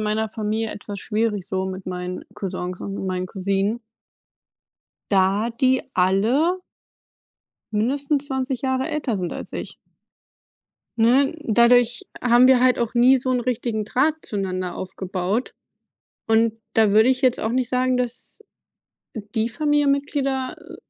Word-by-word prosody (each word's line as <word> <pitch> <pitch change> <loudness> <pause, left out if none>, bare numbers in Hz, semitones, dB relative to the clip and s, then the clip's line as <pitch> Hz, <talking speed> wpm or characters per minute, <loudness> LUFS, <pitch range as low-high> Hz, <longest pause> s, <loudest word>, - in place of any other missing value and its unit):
meiner 215 +1 0
Familie 220 +1 -2
etwas 205 -1 -7
schwierig 210 -3 -1
so 190 0 -2
mit 190 0 -6
meinen 180 0 -5
Cousins 185 -2 -5
und 195 -1 -5
meinen 185 -1 -2
Cousinen 195 +4 -1 1.3
da 200 +3 +2
die 260 -1 +3
alle 230 - +2 1.1
mindestens 275 +6 0
20 265 -2 -2
Jahre 260 +1 0
älter 295 -8 -2
sind 180 -2 -3
als - - -7
ich. - - -6 1.2
Ne? 260 +6 +4
Dadurch 235 0 +4 0.2
haben 245 +1 +6
wir 260 -2 +6
halt 255 0 +4
auch 235 0 -2
nie 250 +2 +5
so 255 +1 -2
'n 250 -1 +1
richtigen 235 -3 -2
Draht 265 +8 +1
zueinander 185 -3 -3
aufgebaut 190 +4 -3 0.7
und 225 0 +3 0.2
da 220 -2 +4
würde 220 +4 +5
ich 260 +1 +1
jetzt 255 -2 +3
auch 220 - -1
nicht 250 0 0
sagen, 255 0 +1
dass 250 - -3 0.7
die 220 +1 -2
Familienmitglieder, 280 -1 0
äh, - - -12
230 Hz, 130 wpm, -22 LUFS, 200-255 Hz, 1.3 s, haben